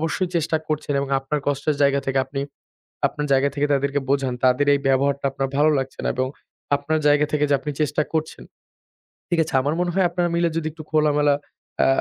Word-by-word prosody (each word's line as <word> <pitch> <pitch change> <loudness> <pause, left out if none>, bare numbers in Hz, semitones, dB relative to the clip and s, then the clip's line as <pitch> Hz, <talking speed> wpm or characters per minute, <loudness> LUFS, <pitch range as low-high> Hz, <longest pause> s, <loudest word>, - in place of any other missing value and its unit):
অবশ্যই 165 +3 -1
চেষ্টা 160 -1 +1
করছেন 150 -1 -2
এবং 140 - -3
আপনার 135 +3 -2
কষ্টের 145 +1 0
জায়গা 140 0 +3
থেকে 135 0 +1
আপনি 135 +1 -4 0.7
আপনার 150 0 -4
জায়গা 135 +1 +3
থেকে 145 0 +1
তাদেরকে 140 +1 +1
বোঝান 135 -2 +1
তাদের 130 +3 +3
এই 140 - +2
ব্যবহারটা 140 +1 +1
আপনার 135 0 -2
ভালো 150 +2 +5
লাগছে 135 0 -4
না - - +1
এবং 130 0 0 0.5
আপনার 155 +2 -1
জায়গা 145 0 +4
থেকে 150 -1 +2
যে 145 - +3
আপনি 150 +2 -4
চেষ্টা 150 -1 +1
করছেন। 160 -1 -3 0.9
ঠিক 175 -1 +1
আছে? - - -9
আমার 145 +3 0
মনে 175 0 0
হয় 190 0 +2
আপনারা 175 0 0
মিলে 170 0 +2
যদি 155 -1 -2
একটু 155 0 -10
খোলামেলা 150 -2 +3 0.5
আ - - +4
145 Hz, 200 wpm, -22 LUFS, 140-155 Hz, 0.9 s, ভালো